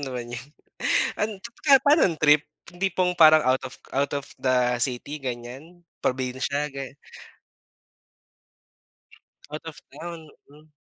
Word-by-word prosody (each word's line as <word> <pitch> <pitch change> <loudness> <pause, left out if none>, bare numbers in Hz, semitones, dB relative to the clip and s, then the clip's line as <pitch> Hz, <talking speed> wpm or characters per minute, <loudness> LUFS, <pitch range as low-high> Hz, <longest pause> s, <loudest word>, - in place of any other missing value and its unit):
naman 125 -3 -5
yun. 120 +1 -6 0.7
An 210 - 0
teka, 270 +5 +4
panong 285 - +4
trip, 150 0 +5 0.3
yung 175 - -16
tipong 185 -2 +1
parang 155 -2 +7
out 130 +1 +2
of 130 - -7 0.2
out 140 +1 0
of 140 - -10
the 125 -1 +2
city, 135 +3 -2
ganiyan. 130 +8 -7 0.2
Probinsya, 130 +3 -1
ga 135 - -4 2.7
Out 150 +1 -6
of 160 -2 -9 0.2
town, 165 -2 -8 0.2
hmm. 150 +2 -19
145 Hz, 120 wpm, -25 LUFS, 130-165 Hz, 2.7 s, parang